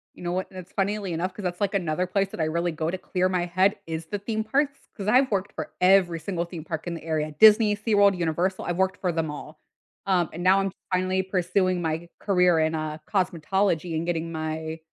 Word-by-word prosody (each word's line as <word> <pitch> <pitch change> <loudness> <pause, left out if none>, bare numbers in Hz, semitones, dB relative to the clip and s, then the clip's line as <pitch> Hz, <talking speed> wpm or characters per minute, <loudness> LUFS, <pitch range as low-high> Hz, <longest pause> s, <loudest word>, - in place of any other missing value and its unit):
You - - -12
know 175 - -2
what, 185 +1 -2
that's 185 -1 -10
funnily 200 -1 -1
enough, 180 +3 -2
'cause 210 - -8
that's 180 0 -3
like 200 0 +1
another 180 -1 0
place 195 +1 0
that - - -9
I - - +2
really 170 +2 0
go 160 0 -2
to 185 - -2
clear 185 0 -1
my 180 -2 0
head 185 +4 +2
is 160 0 -5
the 205 - -3
theme 220 +2 -2
parks, 275 +5 0 0.2
'cause 200 -2 -5
I've 255 +4 +4
worked 200 0 -1
for - - -6
every 180 -2 +4
single 170 +1 -3
theme 170 -2 -8
park 160 0 -5
in 170 - -3
the 165 - -9
area, 155 -1 -1
Disney, 215 -1 +7
SeaWorld, 205 -2 +3
Universal, 175 +3 -1
I've 175 0 -2
worked 190 0 +1
for 180 -2 0
them 160 -1 -1
all. 150 +1 -8 0.5
Um, 180 -4 +2
and 175 +2 -5
now 190 +1 +5
I'm 195 0 -1 0.2
finally 185 +1 +1
pursuing 185 -1 0
my 165 +1 -3
career 180 -4 +3
in, 160 0 +1
uh, 155 -1 -3
cosmetology 180 -2 0
and 160 +1 -1
getting 165 -1 -2
my 160 0 -4
180 Hz, 225 wpm, -25 LUFS, 165-195 Hz, 0.5 s, Disney